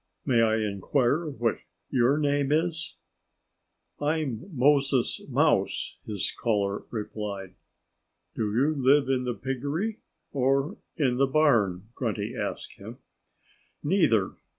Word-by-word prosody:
"May 120 -4 +3
I 110 -1 +3
inquire 120 - 0
what 120 -5 -1 0.3
your 130 +3 +3
name 145 -2 +1
is?" 160 +1 0 1.0
"I'm 145 - -1
Moses 140 -2 +2
Mouse," - - +1
his 100 -3 -1
caller 100 -3 -1
replied. 105 -4 -5 0.8
"Do 110 -2 -1
you 135 +8 +2
live 135 0 +4
in 130 -1 +1
the 120 -1 -2
piggery? 145 - -3 0.3
or 135 +6 +1 0.2
in 130 -6 +1
the 135 +1 +3
barn?" 110 - +2
Grunty - - -3
asked - - -5
him. - - -9 0.9
"Neither!" - - +2
130 Hz, 110 wpm, -27 LUFS, 110-145 Hz, 1.0 s, live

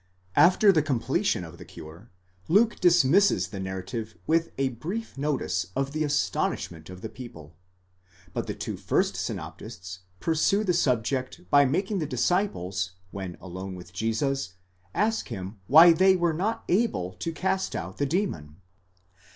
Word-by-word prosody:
After 190 +3 +6
the 160 -5 +3
completion 135 -6 0
of - - -11
the - - -8
cure, 85 +9 -12 0.4
Luke 215 +7 +3
dismisses 175 +3 +4
the 100 - -7
narrative 95 +4 -5
with 165 +1 +2
a 135 -1 +1
brief 180 - -5
notice 135 -11 -1
of 135 0 -1
the 155 +1 -1
astonishment 90 - -1
of 90 0 -10
the - - -4
people; 80 - -11 0.8
but - - -3
the - - -3
two - - -5
first - - 0
synoptists 95 +1 -6 0.2
pursue 165 - +2
the 185 -4 +1
subject 130 - 0
by 145 0 +7
making 190 +9 0
the 155 - -2
disciples, 100 - -1 0.2
when 95 -3 -6
alone 95 +1 -7
with 90 0 -11
Jesus, 115 +1 -1 0.4
ask 220 +2 +1
him 100 -2 -7
why 165 +5 +9
they 190 +3 +5
were 175 -2 +1
not 200 +8 -1
able 175 - +1
to 165 - -2
cast 190 +3 -1
out - - -5
the 145 - +1
demon? 135 - -2
135 Hz, 150 wpm, -27 LUFS, -, 0.8 s, why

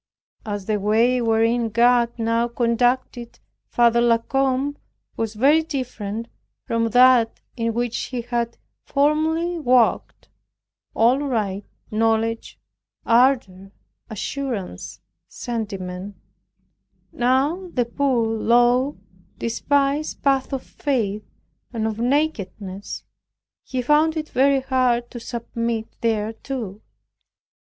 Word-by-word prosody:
As 205 -2 -4
the 215 0 0
way, 230 +5 +2
wherein 230 +1 +2
God 235 +1 +3
now 230 +1 +1
conducted 240 0 0 0.3
Father 235 0 +3
La 235 -1 +4
Combe, 270 +3 0 0.4
was 225 -1 -3
very 285 +8 +4
different 235 -8 -5 0.4
from 230 0 0
that 245 -1 +5 0.2
in 230 -2 -2
which 240 -1 -1
he 250 -2 -4
had 235 -1 -2 0.3
formerly 315 +4 +1
walked 250 -5 +1 0.7
(all 240 +4 +4
light, 215 -8 -2 0.3
knowledge, 225 +1 0 0.5
ardor, 230 -6 +2 0.4
assurance, 225 -2 -5 0.3
sentiment) 200 -5 -5 1.0
now 270 +9 +1
the 245 -5 0
poor, 250 -1 0
low, 240 +4 +2 0.4
despised 280 +5 0
path 270 -1 +1
of 270 -2 -3
faith, 215 -7 -2 0.4
and 225 -2 -2
of 220 0 -3
nakedness; 220 -8 -2 0.6
he 255 -1 -3
found 310 +4 +3
it 310 0 -4
very 275 +1 +3
hard 255 -2 +1
to 240 - -7
submit 230 -1 -4
thereto. 220 -1 -3
235 Hz, 100 wpm, -22 LUFS, 225-265 Hz, 1.0 s, that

